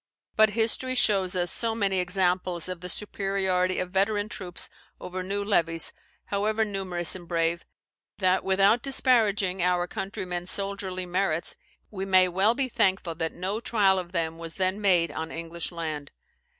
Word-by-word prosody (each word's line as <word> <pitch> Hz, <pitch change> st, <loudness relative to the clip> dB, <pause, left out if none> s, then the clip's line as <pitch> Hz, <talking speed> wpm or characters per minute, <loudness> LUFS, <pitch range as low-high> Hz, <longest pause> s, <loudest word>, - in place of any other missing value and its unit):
But 220 Hz, 0 st, +5 dB
history 245 Hz, +3 st, 0 dB
shows 195 Hz, -6 st, +2 dB
us 175 Hz, -1 st, +1 dB
so 225 Hz, -1 st, 0 dB
many 195 Hz, -4 st, +1 dB
examples 180 Hz, -1 st, +1 dB
of 180 Hz, -2 st, -6 dB
the 180 Hz, -, -6 dB
superiority 190 Hz, -2 st, 0 dB
of 180 Hz, 0 st, -3 dB
veteran 205 Hz, +2 st, 0 dB
troops 180 Hz, -4 st, -1 dB, 0.3 s
over 185 Hz, +1 st, -5 dB
new 200 Hz, +2 st, -2 dB
levies, 165 Hz, -5 st, +1 dB, 0.3 s
however 215 Hz, +2 st, 0 dB
numerous 190 Hz, -4 st, +1 dB
and 175 Hz, -2 st, -10 dB
brave, 170 Hz, 0 st, -1 dB, 0.5 s
that 185 Hz, -1 st, +2 dB
without 195 Hz, +4 st, +3 dB
disparaging 210 Hz, -8 st, +2 dB
our 175 Hz, 0 st, +2 dB
countrymen's 180 Hz, -1 st, -5 dB
soldierly 195 Hz, -2 st, 0 dB
merits, 175 Hz, -3 st, 0 dB, 0.4 s
we 195 Hz, -2 st, -4 dB
may 185 Hz, -1 st, +5 dB
well 195 Hz, +6 st, +2 dB
be 270 Hz, 0 st, 0 dB
thankful 190 Hz, -7 st, +1 dB
that 160 Hz, 0 st, -3 dB
no 190 Hz, +5 st, -3 dB
trial 200 Hz, -5 st, +2 dB
of 175 Hz, -1 st, -7 dB
them 165 Hz, -2 st, -2 dB
was 165 Hz, 0 st, -6 dB
then 190 Hz, +2 st, 0 dB
made 180 Hz, -4 st, +3 dB
on 160 Hz, 0 st, -5 dB
English 165 Hz, +1 st, -5 dB
land. 155 Hz, -4 st, -5 dB
185 Hz, 155 wpm, -26 LUFS, 175-200 Hz, 0.5 s, But